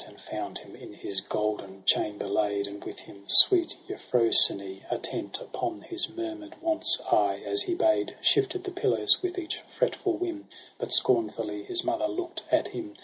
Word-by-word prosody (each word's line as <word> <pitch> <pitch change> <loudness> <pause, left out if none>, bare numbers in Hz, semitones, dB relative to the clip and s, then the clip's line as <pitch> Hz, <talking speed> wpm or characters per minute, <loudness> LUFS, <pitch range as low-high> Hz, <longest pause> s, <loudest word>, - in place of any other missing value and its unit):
And - - -16
found - - -6
him - - -12
in - - -12
his 95 -1 -5
golden 100 -3 -4
chamber 105 -1 +1
laid; 100 0 0
And 100 0 -9
with - - -8
him 100 0 -15
sweet 350 -3 +7
Euphrosyne, 100 -5 +2
attent - - -4
Upon 355 -9 -5
his 350 0 -4
murmur'd 330 -1 -7
wants, 325 0 +1
aye - - +2
as 400 - +3
he 365 -3 -1
bade 330 -1 +1
Shifted 395 -2 +2
the 375 - -5
pillows 365 0 +2
with 365 0 -3
each 340 -2 -4 0.2
fretful 445 -7 0
whim; 335 -3 -5 0.3
But - - -5
scornfully 360 -4 +1
his 360 -2 -1
mother 335 -1 0
look'd 355 +1 -5
at - - +2
him. 325 -2 -7
330 Hz, 165 wpm, -27 LUFS, -, 0.3 s, sweet